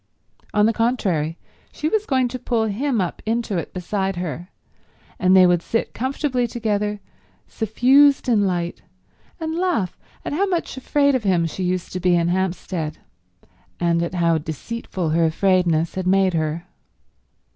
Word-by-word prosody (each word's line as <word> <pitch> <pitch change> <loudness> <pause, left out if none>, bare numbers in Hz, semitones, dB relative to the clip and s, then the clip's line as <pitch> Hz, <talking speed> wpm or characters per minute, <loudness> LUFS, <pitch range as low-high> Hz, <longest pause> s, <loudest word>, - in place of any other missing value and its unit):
On 210 0 +3
the 225 - +3
contrary, 190 -10 0 0.3
she 305 - -3
was 430 +5 0
going 260 -2 +2
to 255 +1 -5
pull 235 -2 0
him 235 +4 -1
up 180 -3 -2
into 225 -4 -1
it - - -6
beside 190 +1 -2
her, 175 0 -5 0.7
and 185 +1 +4
they 185 - +8
would 175 -1 +3
sit 230 +5 -2
comfortably 260 -1 -1
together, 210 -3 -1 0.5
suffused 265 +6 +3
in 210 -5 +3
light, 175 -2 -2 0.6
and 320 -1 -3
laugh 335 - -1 0.3
at - - -3
how 390 +7 +1
much 350 -3 -2
afraid 280 +2 +2
of 260 - +1
him 180 -4 +2
she 165 +3 -5
used 180 -1 -2
to 185 - -2
be 180 -1 +3
in 170 0 +2
Hampstead, 180 -3 -2 0.8
and 170 -1 +2
at 170 +1 -3
how 170 -2 +2
deceitful 170 +3 -4
her 165 +1 +3
afraidness 170 -2 +2
had 185 -1 -3
made 190 -1 +3
her. 160 +1 -2
190 Hz, 155 wpm, -22 LUFS, 175-245 Hz, 0.8 s, they